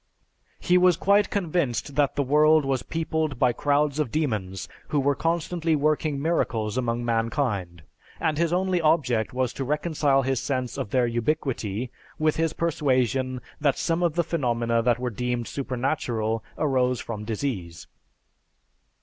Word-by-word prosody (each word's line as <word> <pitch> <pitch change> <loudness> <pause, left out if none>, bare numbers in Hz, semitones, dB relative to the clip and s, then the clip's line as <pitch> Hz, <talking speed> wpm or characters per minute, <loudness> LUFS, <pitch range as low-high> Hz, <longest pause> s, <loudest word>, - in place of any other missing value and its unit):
He 180 +1 +3
was 180 -2 +4
quite 200 +1 +3
convinced 160 - -1
that 145 -2 +2
the 140 - +1
world 150 +2 +4
was 135 -2 0
peopled 160 -1 -2
by 125 -1 +3
crowds 145 +2 +1
of 150 -5 0
demons, 105 - -2 0.2
who 150 - 0
were 140 +1 +2
constantly 165 +1 0
working 150 0 +1
miracles 120 -9 0
among 120 -1 -1
mankind; 115 - -1 0.4
and 155 -1 0
his 170 -1 +2
only 180 0 +1
object 135 -9 +2
was 130 -1 -1
to 135 - -4
reconcile 145 -1 +1
his 135 -1 0
sense 130 -3 -2
of - - -4
their 125 +1 +2
ubiquity 120 -2 -2 0.3
with 155 -1 +1
his 165 -1 +1
persuasion 130 -5 0 0.2
that 145 -3 +2
some 165 0 0
of 170 -3 +1
the 170 - +2
phenomena 120 -8 0
that 120 0 +2
were 125 0 -3
deemed 120 +1 -2
supernatural 120 -4 -2
arose 130 -4 +1
from 105 -2 -5
disease. 105 - -4
135 Hz, 150 wpm, -25 LUFS, 120-155 Hz, 0.4 s, was